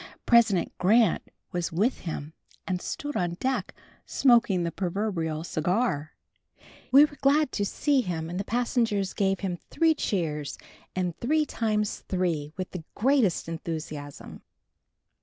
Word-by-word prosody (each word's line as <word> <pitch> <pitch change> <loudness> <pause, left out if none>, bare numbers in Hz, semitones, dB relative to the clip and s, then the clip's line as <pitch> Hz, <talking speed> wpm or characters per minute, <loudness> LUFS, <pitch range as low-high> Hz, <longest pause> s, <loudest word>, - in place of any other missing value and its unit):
President 225 -6 +4
Grant 215 +1 +4 0.3
was 175 -1 -2
with 205 +10 +1
him 155 -2 -5 0.3
and 180 -1 -2
stood 290 0 -4
on 175 -1 0
deck, 260 +8 -1 0.3
smoking 235 -8 +3
the 170 - -1
proverbial 175 -5 -2
cigar. 170 -1 -1 0.8
We 280 +3 +9
were 290 -1 -10
glad 285 +1 +3
to 205 - -1
see 280 +6 +2
him 165 -6 -3
and 175 +2 -4
the - - -1
passengers 225 -4 0
gave 195 -2 0
him 180 -3 -2
three 325 -1 +3
cheers 160 - -2 0.4
and 180 -2 -1
three 305 +5 +2
times 215 -5 -1
three, 170 -6 -1
with 185 -1 -4
the 180 -3 -6
greatest 240 - +2
enthusiasm. 155 -3 -6
190 Hz, 135 wpm, -27 LUFS, 170-240 Hz, 0.8 s, We